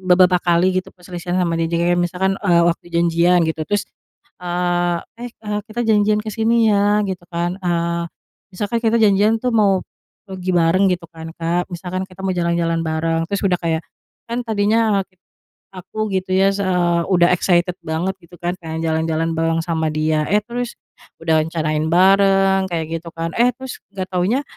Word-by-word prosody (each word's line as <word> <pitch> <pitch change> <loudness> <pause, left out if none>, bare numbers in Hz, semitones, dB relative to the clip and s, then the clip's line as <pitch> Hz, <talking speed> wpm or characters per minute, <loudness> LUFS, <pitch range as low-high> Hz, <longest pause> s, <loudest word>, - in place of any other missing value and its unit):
beberapa 180 -1 +5
kali 180 +2 +2
gitu, - - -12
perselisihan 180 0 -4
sama 170 -2 0
dia, 165 - 0
jadi 170 +1 +2
kayak - - 0
misalkan, 190 +2 0
eee, 175 -4 +3
waktu 170 - -1
janjian 170 +1 +3
gitu, 160 -1 -2
terus, 205 0 -1 0.6
eee, 175 0 0 0.2
"Eh 245 0 -6
eee, 210 -2 -4
kita 235 +2 -3
janjian 210 -1 +3
ke 215 - -6
sini 225 +1 +2
ya," 205 +1 +3
gitu 185 -2 -5
kan, 175 +1 -2
eee, 170 -1 -1 0.5
misalkan 205 +5 -2
kita 225 0 +2
janjian 210 +2 +4
tuh 250 - 0
mau 200 -3 +4 0.5
pergi 185 -1 -4
bareng, 175 +3 +3
gitu 170 -1 -14
kan 160 0 -9
Kak, 170 +2 -1
misalkan 185 +2 -4
kita 185 0 -13
mau 190 - 0
jalan-jalan 170 -1 0
bareng, 165 +1 -1
terus 200 +2 -2
udah 185 -2 +2
kayak, 165 -1 -1 0.5
kan 235 - -2
tadinya 215 -1 +2 0.7
aku 190 +4 -4
gitu 185 0 -2
ya, 195 +1 +4
eee, 180 -3 +1
udah 175 -1 +4
excited 175 0 +2
banget 165 +4 -2
gitu 170 +1 -16
kan, 175 0 -2
kayak 160 0 -5
jalan-jalan 160 0 0
bareng 165 0 0
sama 160 -2 -1
dia, 155 0 0
eh 210 +1 +3
terus, 240 0 -4 0.5
udah 160 -1 +3
rencanain 155 -1 -1
bareng, 195 +1 +4
kayak 165 -1 -3
gitu 170 - -14
kan, 165 0 -3
eh 240 +1 +5
terus 265 -1 -8 0.2
nggak 185 - -3
taunya, 190 +10 +1
180 Hz, 175 wpm, -19 LUFS, 170-200 Hz, 0.7 s, beberapa